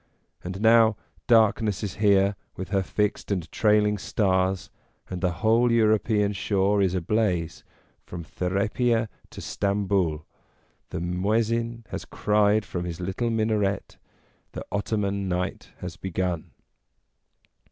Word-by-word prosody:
And 95 Hz, +3 st, -5 dB
now 110 Hz, -1 st, +5 dB, 0.3 s
darkness 110 Hz, -3 st, +3 dB
is 100 Hz, -1 st, -4 dB
here 100 Hz, -1 st, +3 dB, 0.2 s
with 95 Hz, -, -6 dB
her 100 Hz, -1 st, +1 dB
fixed 105 Hz, +2 st, -1 dB
and 90 Hz, -5 st, -1 dB
trailing 105 Hz, -1 st, +3 dB
stars, 95 Hz, -4 st, 0 dB, 0.4 s
and 90 Hz, -1 st, -4 dB
the 90 Hz, -, +2 dB, 0.2 s
whole 115 Hz, +2 st, +4 dB
European 110 Hz, -2 st, +2 dB
shore 100 Hz, 0 st, +1 dB
is 95 Hz, -1 st, +1 dB
ablaze 90 Hz, -3 st, -1 dB, 0.4 s
from 85 Hz, -1 st, -7 dB
Therapia 105 Hz, +7 st, 0 dB, 0.2 s
to -, -, -9 dB
Stamboul; 100 Hz, -6 st, 0 dB, 0.6 s
the -, -, -4 dB
Muezzin 115 Hz, +6 st, -1 dB
has -, -, -5 dB
cried 105 Hz, 0 st, +2 dB
from 90 Hz, -1 st, -4 dB
his 85 Hz, -1 st, -5 dB
little 95 Hz, +6 st, -2 dB
minaret, 110 Hz, -3 st, -1 dB, 0.6 s
the -, -, -6 dB
Ottoman 100 Hz, -1 st, -1 dB
night 90 Hz, +1 st, -3 dB
has 90 Hz, -1 st, -6 dB
begun. 90 Hz, -2 st, -3 dB
100 Hz, 120 wpm, -25 LUFS, 95-110 Hz, 0.6 s, now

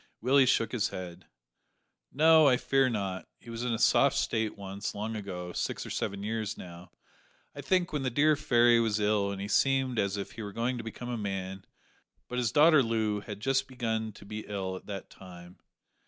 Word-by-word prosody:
Willie 130 Hz, +3 st, +4 dB
shook 115 Hz, -3 st, +2 dB
his 115 Hz, -4 st, 0 dB
head. 90 Hz, -2 st, -8 dB, 0.8 s
"No, 160 Hz, +1 st, +6 dB
I 125 Hz, -2 st, +5 dB
fear 135 Hz, 0 st, +2 dB
not. 100 Hz, -5 st, -3 dB
He 115 Hz, -, -12 dB
was 115 Hz, 0 st, -5 dB
in 125 Hz, -, -1 dB
a 115 Hz, -, 0 dB
soft 140 Hz, +4 st, +4 dB
state 110 Hz, -5 st, -1 dB
once 100 Hz, +1 st, -5 dB
long 110 Hz, +2 st, -4 dB
ago 90 Hz, -4 st, -6 dB
six -, -, -3 dB
or -, -, -7 dB
seven 100 Hz, 0 st, -3 dB
years 110 Hz, -1 st, -3 dB
now, 85 Hz, 0 st, -11 dB, 0.7 s
I -, -, -6 dB
think 185 Hz, -3 st, +1 dB
when 150 Hz, -, -1 dB
the 130 Hz, -, 0 dB
dear 150 Hz, +5 st, +3 dB
fairy 120 Hz, -5 st, +4 dB
was 110 Hz, -2 st, +1 dB
ill 105 Hz, -1 st, +1 dB
and 100 Hz, -, -5 dB
he 100 Hz, -, -4 dB
seemed 130 Hz, +1 st, +2 dB
as 100 Hz, 0 st, 0 dB
if 100 Hz, -, -5 dB
he 115 Hz, -, -8 dB
were 100 Hz, -2 st, -6 dB
going 120 Hz, +3 st, -1 dB
to -, -, -5 dB
become 115 Hz, +2 st, -7 dB
a 120 Hz, -2 st, -3 dB
man; 95 Hz, -2 st, -4 dB, 0.6 s
but 125 Hz, -, -3 dB
his 120 Hz, -3 st, 0 dB
daughter 155 Hz, +2 st, +6 dB
Loo 110 Hz, -3 st, 0 dB
had 105 Hz, 0 st, -8 dB
just 135 Hz, +3 st, +1 dB
begun 110 Hz, -4 st, -3 dB
to 100 Hz, -, -14 dB
be 105 Hz, +1 st, -6 dB
ill 95 Hz, -2 st, -3 dB
at -, -, -11 dB
that 100 Hz, -2 st, -7 dB
time. 90 Hz, -1 st, -13 dB
110 Hz, 205 wpm, -29 LUFS, 100-125 Hz, 0.8 s, No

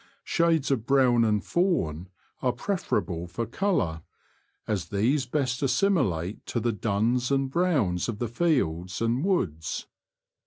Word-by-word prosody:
Shades 165 Hz, -5 st, +2 dB
of 120 Hz, -4 st, -1 dB
brown 130 Hz, -4 st, +4 dB
and 105 Hz, -2 st, +1 dB
fawn 95 Hz, -, 0 dB, 0.3 s
are 125 Hz, -2 st, +1 dB
preferable 120 Hz, -, -2 dB
for 105 Hz, +7 st, -3 dB
colour, 115 Hz, -, -1 dB, 0.7 s
as 100 Hz, -6 st, -1 dB
these 125 Hz, +7 st, +1 dB
best 130 Hz, -2 st, -1 dB
assimilate 120 Hz, -, +1 dB
to 120 Hz, -, -1 dB
the 120 Hz, +1 st, 0 dB
duns 115 Hz, +5 st, 0 dB
and 135 Hz, -1 st, +1 dB
browns 135 Hz, -, +1 dB
of 110 Hz, -, -3 dB
the 120 Hz, -, -2 dB
fields 105 Hz, -, 0 dB
and 115 Hz, +4 st, 0 dB
woods. 85 Hz, -, -1 dB
120 Hz, 130 wpm, -27 LUFS, 100-145 Hz, 0.7 s, brown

